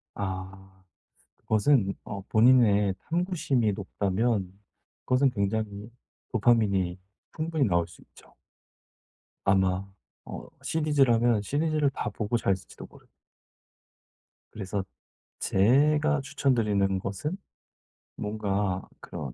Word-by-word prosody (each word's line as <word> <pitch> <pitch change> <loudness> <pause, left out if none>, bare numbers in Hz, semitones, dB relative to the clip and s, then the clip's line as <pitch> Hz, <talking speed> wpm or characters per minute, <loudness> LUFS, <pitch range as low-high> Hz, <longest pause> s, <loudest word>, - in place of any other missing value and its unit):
아. 95 0 -5 0.7
그것은 110 -2 +2
어 100 -2 -6
본인의 110 -4 +5 0.2
탐구심이 160 - +1
높다면 100 0 -1 0.5
그것은 130 +2 +3
굉장히 105 -1 -2 0.4
도파민이 100 -6 +2 0.4
충분히 160 -3 0
나올 85 -5 +1
수 85 - -16
있죠. - - -20 1.1
아마 95 0 +2 0.4
어 - - -8 0.2
시리즈라면 125 -8 +2
시리즈를 150 +4 +1
다 - - -3
보고 105 +1 -3
자실지도 95 -4 -3
모릅니다. - - -19 1.4
그래서 100 -1 -4 0.6
제가 150 +8 +3
추천드리는 105 -8 +1
것은 100 - -4 0.8
뭔가 100 -3 -2
그런 - - -7
105 Hz, 225 characters per minute, -27 LUFS, 95-135 Hz, 1.4 s, 본인의